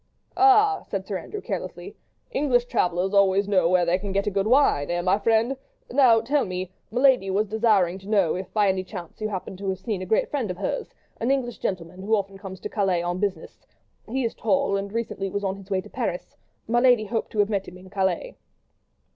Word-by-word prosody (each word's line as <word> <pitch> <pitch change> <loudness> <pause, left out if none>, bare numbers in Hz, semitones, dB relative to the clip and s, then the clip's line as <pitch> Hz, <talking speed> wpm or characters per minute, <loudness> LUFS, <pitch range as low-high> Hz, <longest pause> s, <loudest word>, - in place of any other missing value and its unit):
"Ah!" 400 +1 +5
said 195 -2 -3
Sir 195 -2 -3
Andrew, 420 - -7
carelessly, - - -6 0.4
"English 250 -4 +2
travellers 185 -5 0
always 200 0 +4
know 185 -4 +3
where 180 -1 +3
they 175 +2 +2
can 200 0 -5
get 200 +1 0
good 195 +1 +1
wine, 245 - +3
eh! 175 0 0
my 185 +3 +2
friend?—Now, 240 +1 +2
tell 275 +5 +1
me, 185 -1 -4 0.2
my 240 - -2
lady 260 -8 +4
was 200 +3 +1
desiring 205 -4 +2
to 195 +2 -12
know 195 -7 +3
if 185 0 -5
by 210 -2 +2
any 190 -1 +1
chance 180 0 -9
you 215 - -1
happen 190 -1 -5
to 195 0 -4
have 190 - -1
seen 190 0 -4
a 185 - -5
great 220 - +1
friend 265 -8 -1
of 180 - -4
hers, 475 - -4 0.2
an 235 - -1
English 260 -3 -1
gentleman, 180 -1 -4
who 215 +3 +2
often 195 -1 -4
comes 190 -2 -8
to - - -4
Calais 190 -5 0
on 175 +1 -2
business; 190 -5 -4 0.5
he 260 +3 -1
is 230 - -2
tall, 200 -2 +1
and 200 0 -3
recently 215 -3 -3
was 200 +2 -3
on 190 -1 -1
his 195 0 -13
way 190 -1 0
to - - -14
Paris—my 240 - -3
lady 245 -3 +4
hoped 225 +2 -3
to - - -6
have 205 0 +3
met 195 -2 -1
him 180 - -10
in 185 0 -15
Calais." 200 - -1
200 Hz, 215 wpm, -25 LUFS, 185-230 Hz, 0.5 s, Ah